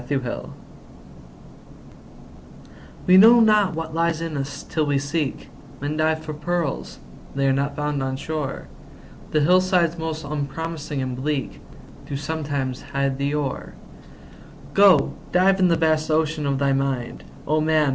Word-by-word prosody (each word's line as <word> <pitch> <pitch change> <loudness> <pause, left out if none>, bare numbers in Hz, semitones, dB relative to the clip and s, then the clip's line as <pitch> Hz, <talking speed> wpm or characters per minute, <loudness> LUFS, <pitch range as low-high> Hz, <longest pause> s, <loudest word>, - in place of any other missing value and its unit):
HIDDEN 135 +1 -2
GEMS 120 - -5 2.6
We 185 +1 +6
know 230 +5 +8
not 210 -5 +4
what 160 -1 -5
lies 165 -1 0
in 165 -2 -4
us, 140 0 -4
till 155 -2 -1
we 145 -1 +2
seek; 145 +1 -3 0.3
Men 145 +2 -3
dive 155 0 0
for 155 - -5
pearls—they 150 -3 -4
are 135 - +3
not 140 +1 -1
found 145 -1 -2
on 130 0 -2
shore, 150 -1 -4 0.6
The 155 - +1
hillsides 180 0 +3
most 160 -1 -4
unpromising 150 0 -4
and 130 -1 -3
bleak 140 +2 -3 0.5
Do 140 - -4
sometimes 145 -4 -3
hide 140 -1 -2
the 140 +1 0
ore. 145 -3 -4 1.0
Go, 195 -8 +5 0.2
dive 190 +2 +3
in 185 - +5
the 170 - +3
vast 155 -1 +1
ocean 155 -1 0
of 140 -1 0
thy 140 0 +1
mind, 135 -3 -2 0.2
O 155 +2 +1
man! 155 -2 +2
150 Hz, 145 wpm, -23 LUFS, 140-165 Hz, 2.6 s, know